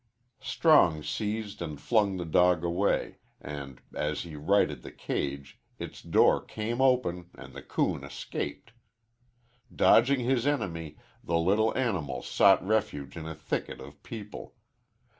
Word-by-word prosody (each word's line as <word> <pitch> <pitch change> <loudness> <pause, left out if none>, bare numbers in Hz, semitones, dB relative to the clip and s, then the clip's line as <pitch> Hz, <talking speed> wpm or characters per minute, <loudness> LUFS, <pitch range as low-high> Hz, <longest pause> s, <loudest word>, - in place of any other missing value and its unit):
Strong 135 - +4
seized 105 0 -3
and 75 -4 -5
flung 105 -5 +1
the 90 - -4
dog 90 +1 +3
away, 90 +4 0 0.2
and 70 -3 -8
as 75 0 -2
he 85 -3 -9
righted 95 +8 +1
the - - -10
cage 70 0 -4 0.2
its - - -8
door - - +3
came 115 +4 -3
open 105 -10 +1
and - - -12
the - - -8
coon - - -1
escaped. 115 - -6 1.0
Dodging 130 +3 +4
his 125 +1 +1
enemy, 85 - -2 0.3
the 85 - 0
little 105 +8 +2
animal 95 - -1
sought 95 -2 +4
refuge 95 -10 -1
in 80 -2 -6
a 80 - -6
thicket 80 +1 -4
of 70 +2 -12
people. 105 -3 -9
90 Hz, 135 wpm, -29 LUFS, 80-110 Hz, 1.0 s, Strong